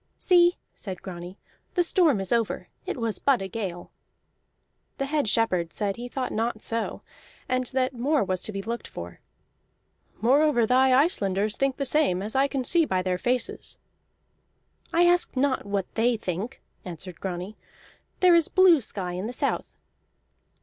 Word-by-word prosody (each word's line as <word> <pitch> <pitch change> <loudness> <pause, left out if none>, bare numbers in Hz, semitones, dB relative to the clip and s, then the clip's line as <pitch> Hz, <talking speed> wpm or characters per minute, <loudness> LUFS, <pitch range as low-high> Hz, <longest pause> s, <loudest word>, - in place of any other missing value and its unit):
"See," 350 -1 +4 0.2
said 190 -4 -8
Grani, 180 0 -8 0.4
"the 355 - +3
storm 330 - +3
is 195 - -3
over; 230 -2 -1 0.2
it 385 - -3
was 230 -3 -2
but 275 -3 +3
a 195 - -4
gale." 185 -4 -5 1.1
The 275 - -1
head 285 -4 0
shepherd 185 -7 +1
said 200 -2 -2
he 240 +1 -6
thought 255 0 -3
not 225 0 -2
so, 230 0 -2 0.4
and 255 0 0
that 260 0 0
more 270 +4 +1
was 185 -2 -2
to - - -2
be 195 -1 -5
looked 235 +3 -4
for. 85 0 -9 1.0
"Moreover, 260 +2 +3
thy 260 +3 +4
Icelanders 210 - +2
think 275 -1 0
the 275 - -1
same, 250 -10 +2
as 215 +4 -5
I 270 +1 +4
can 275 -2 -2
see 335 +7 +4
by 185 -11 0
their 180 -1 -1
faces." 250 +3 -2 1.1
"I 345 +1 +4
ask 350 -5 +2
not 260 -4 +1
what 200 -2 -3
they 230 +1 +2
think," 200 +6 -5 0.2
answered 180 0 -8
Grani. 185 +2 -5 0.7
"There 365 -1 +6
is 335 -2 +5
blue 365 -5 +5
sky 190 -5 -4
in 185 +4 -4
the 245 - -5
south." - - -2
235 Hz, 165 wpm, -26 LUFS, 195-275 Hz, 1.1 s, There